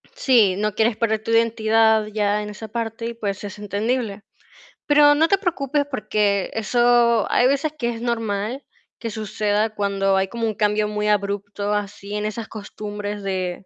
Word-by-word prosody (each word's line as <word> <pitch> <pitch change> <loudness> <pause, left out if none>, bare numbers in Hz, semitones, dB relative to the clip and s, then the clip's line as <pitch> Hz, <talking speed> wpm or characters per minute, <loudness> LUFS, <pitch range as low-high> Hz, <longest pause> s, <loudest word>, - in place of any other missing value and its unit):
sí, 235 - +4
no 210 +1 -1
quieres 220 +1 +1
perder 220 -2 0
tu - - -7
identidad, 225 -1 +3
ya 210 -1 0
en 210 - -6
esa 210 +1 -8
parte 225 +1 -4
y 235 - -4
pues, 205 -4 -4
es 205 0 -7
entendible. 210 +1 -2 0.6
Pero 290 0 +6
no 315 +3 +3
te 395 - +3
preocupes, 295 -7 -1
porque 210 -5 0
eso 235 0 +3
hay 245 - +4
veces 280 +3 0
que 240 -4 -1
es 230 -1 -5
normal 225 +1 -2 0.3
que 230 - -5
suceda 215 0 -1
cuando 195 -1 +1
hay 190 0 +1
como 230 0 -2
un 220 - -1
cambio 210 0 +1
muy 210 0 -1
abrupto 205 0 -1
así 205 0 -4
en 210 0 -2
esas 220 +1 -4
costumbres 205 -1 -6
de 185 -1 -3
215 Hz, 170 wpm, -22 LUFS, 205-235 Hz, 0.6 s, Pero